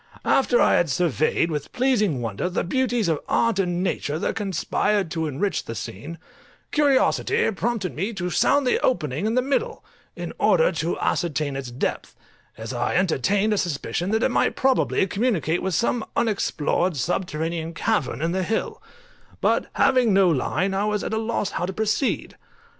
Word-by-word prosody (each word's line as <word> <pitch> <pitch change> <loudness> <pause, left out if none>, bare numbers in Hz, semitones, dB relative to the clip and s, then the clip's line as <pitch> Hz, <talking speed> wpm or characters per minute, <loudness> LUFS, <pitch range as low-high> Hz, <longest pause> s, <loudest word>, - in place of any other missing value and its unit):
After 255 -2 +3
I - - +4
had 170 - +1
surveyed 165 +2 +1
with 150 -2 -4
pleasing 215 - +1
wonder 115 - -2
the 180 - -1
beauties 245 0 0
of 160 -3 +1
art 230 -4 +2
and 180 -1 0
nature 155 -5 -2
that - - -2
conspired 200 -1 0
to 160 -2 -1
enrich 155 +8 -2
the 115 - -6
scene, 130 - -7 0.5
curiosity 285 -5 +2
prompted 215 -3 -2
me 195 +8 -2
to 180 -3 -3
sound 285 +8 +3
the 250 - +2
opening 160 - 0
in 225 - 0
the 255 - +2
middle, 450 - -2 0.3
in - - -6
order - - +4
to - - -2
ascertain 155 -5 -1
its 135 -2 -5
depth, 120 +2 -3 0.4
as 110 +2 -6
I 120 - -1
entertained 195 - +2
a 205 - +1
suspicion 175 +2 -2
that 220 +2 +1
it - - +3
might - - +1
probably 260 -7 +2
communicate 190 - 0
with 190 -3 -1
some 235 +4 +1
unexplored 185 -6 0
subterranean 165 0 -2
cavern 155 - -1
in 165 - 0
the 190 +1 0
hill; 225 - -2 0.6
but - - +1
having 245 -6 +3
no 195 -2 +5
line 180 +6 0
I 195 +2 0
was 210 -1 -1
at - - -3
a 220 - 0
loss 220 -3 -2
how 175 - -2
to 190 - -4
proceed. 220 +6 -1
190 Hz, 170 wpm, -23 LUFS, 160-225 Hz, 0.6 s, no